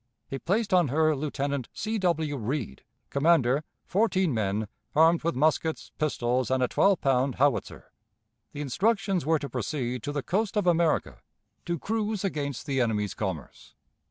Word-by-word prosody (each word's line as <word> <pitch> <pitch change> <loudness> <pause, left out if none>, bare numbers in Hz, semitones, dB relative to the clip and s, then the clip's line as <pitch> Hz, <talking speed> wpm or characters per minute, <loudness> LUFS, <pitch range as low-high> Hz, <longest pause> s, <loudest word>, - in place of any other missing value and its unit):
He 135 - -5
placed 200 - 0
on 175 -4 +5
her 155 +3 +2
Lieutenant 140 -2 -2
C. 220 0 -2
W. 160 -5 0
Read, 120 - -4 0.3
commander, 140 -2 +3 0.2
fourteen 190 - +1
men, 105 -1 -1 0.3
armed 165 +2 +5
with 170 +1 0
muskets, 155 +3 0
pistols, 125 -5 0
and 130 0 +2
a - - +3
twelve 195 +8 +3
pound 135 -1 +2
howitzer. 140 -2 0 0.6
The 145 - -6
instructions 190 - 0
were 160 0 +4
to 145 -1 -5
proceed 125 0 -3
to 145 - -4
the 145 -2 -3
coast 205 - -1
of 205 - +1
America, 165 - +1 0.5
to 170 0 0
cruise 215 +2 -2
against 145 -9 -3
the 135 -3 0
enemy's 105 -4 0
commerce. 95 -9 -6
145 Hz, 155 wpm, -27 LUFS, 125-175 Hz, 0.6 s, on